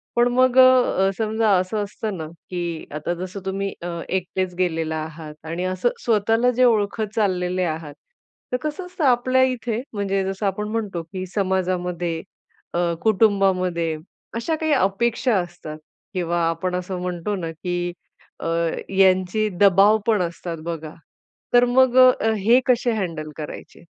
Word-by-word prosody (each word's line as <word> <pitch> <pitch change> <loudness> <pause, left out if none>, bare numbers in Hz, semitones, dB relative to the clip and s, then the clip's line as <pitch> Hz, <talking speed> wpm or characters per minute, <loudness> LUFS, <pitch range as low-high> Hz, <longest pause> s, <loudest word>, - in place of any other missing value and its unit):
पण 240 0 +4
मग 255 0 +3
अ, 255 -7 +5
समजा 220 0 +1
असं 205 +3 -1
असतं 205 0 -5
ना, 160 -1 -5 0.2
की 175 -3 -4
आता 155 +3 -2
जसं 185 +2 -6
तुम्ही 195 +1 -2
अ, 175 - -5 0.2
एकटेच 185 0 -2
गेलेला 165 -3 0
आहात 155 0 -6
आणि 170 +3 -3
असं 185 +6 +1 0.2
स्वतःला 225 +2 +3
जे - - +6
ओळखत 215 -2 +1
चाललेले 185 -3 0
आहात. 155 -2 -8 0.6
तर 250 - +1
कसं 310 +5 -4
असतं 360 -2 -5
आपल्या 255 0 +3
इथे, 245 -3 -1
म्हणजे 195 -2 -1
जसं 195 +2 -3
आपण 200 +2 -1
म्हणतो 210 -6 -2
की 185 +2 -6
समाजामध्ये 180 -3 -1 0.5
अ, 170 0 +1
कुटुंबामध्ये, 190 -6 +2 0.4
अशा 235 +8 -1
काही 315 0 -1
अपेक्षा 235 +1 +1
असतात 175 -3 -7 0.4
किंवा 175 -2 -1
आपण 180 +2 -2
असं 180 0 -4
म्हणतो 180 +3 -3
ना, 170 -4 -4
की 175 +1 -3 0.5
अ, - - -4 0.5
यांची 190 +2 +3
दबाव 200 +2 +6
पण 215 -4 +3
असतात 170 -1 -4
बघा. 160 -2 -5 0.6
तर 245 0 +6
मग 255 0 +3
अ, 255 -3 +6
हे 230 +5 +5
कसे 245 -1 +3
हँडल 165 -7 -3
करायचे? 155 +2 -9
190 Hz, 145 wpm, -22 LUFS, 175-225 Hz, 0.6 s, जे